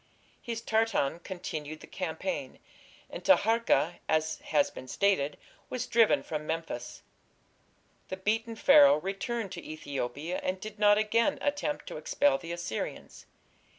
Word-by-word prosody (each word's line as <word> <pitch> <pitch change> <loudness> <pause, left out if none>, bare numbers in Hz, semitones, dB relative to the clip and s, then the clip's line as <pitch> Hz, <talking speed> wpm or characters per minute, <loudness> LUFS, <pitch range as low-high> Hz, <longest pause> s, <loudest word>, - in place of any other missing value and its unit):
His 230 -1 -4
Tartan 220 -10 +1
continued 155 -5 -6
the - - -10
campaign, 185 - -4 0.5
and - - -8
Taharka, 225 - +3
as 155 0 +1
has 150 -2 +1
been 130 - -10
stated, 150 -2 +1 0.3
was 250 -1 -3
driven 230 -3 +4
from 155 -1 -5
Memphis. 160 -7 -4 1.0
The 190 - -5
beaten 225 +4 -1
Pharaoh 280 - +7
returned 195 +4 -3
to - - -7
Ethiopia 145 +2 -4
and 185 0 -2
did 215 +1 -8
not 205 -1 +6
again 230 +6 +2
attempt 290 +1 -2
to - - -7
expel 285 -1 +2
the 165 - -7
Assyrians. 170 -10 -5
195 Hz, 130 wpm, -30 LUFS, 155-230 Hz, 1.0 s, Pharaoh